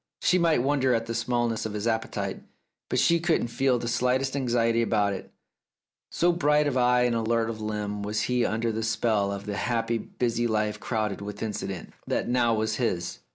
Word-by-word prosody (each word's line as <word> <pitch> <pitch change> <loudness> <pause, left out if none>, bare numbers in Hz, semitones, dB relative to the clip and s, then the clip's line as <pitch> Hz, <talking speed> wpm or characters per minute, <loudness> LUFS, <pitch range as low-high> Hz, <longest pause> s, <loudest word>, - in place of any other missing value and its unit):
She 180 - +3
might 165 -7 +3
wonder 135 -2 +2
at 115 0 -1
the 115 - -4
smallness 120 -1 0
of 105 - -7
his 105 +1 -3
appetite, 110 -1 -2 0.5
but - - 0
she 170 0 +4
could 165 -1 +2
not 120 - -4
feel 130 +1 +2
the 120 - -4
slightest 130 +3 +1
anxiety 120 -3 +1
about 105 -3 +1
that, 95 - -7 0.8
so 175 +1 +2
bright 150 -3 +2
of 145 -3 0
eye 125 -1 +4
and 120 -1 +2
alert 115 0 +1
of 110 -1 -8
limb 105 -1 -3
was 105 +1 -1
he 125 -1 +1
under 115 +1 0
the 110 +1 -3
spell 110 -3 +1
of 100 0 -5
the 105 -1 -3
happy 115 -1 0
busy 120 +1 -1
life 105 -1 -1
crowded 105 -4 -2
with 105 +1 -6
incident, 100 -4 -5
that - - -1
now 120 -1 +2
was 110 0 -1
his. 95 -8 -2
115 Hz, 200 wpm, -27 LUFS, 110-125 Hz, 0.8 s, she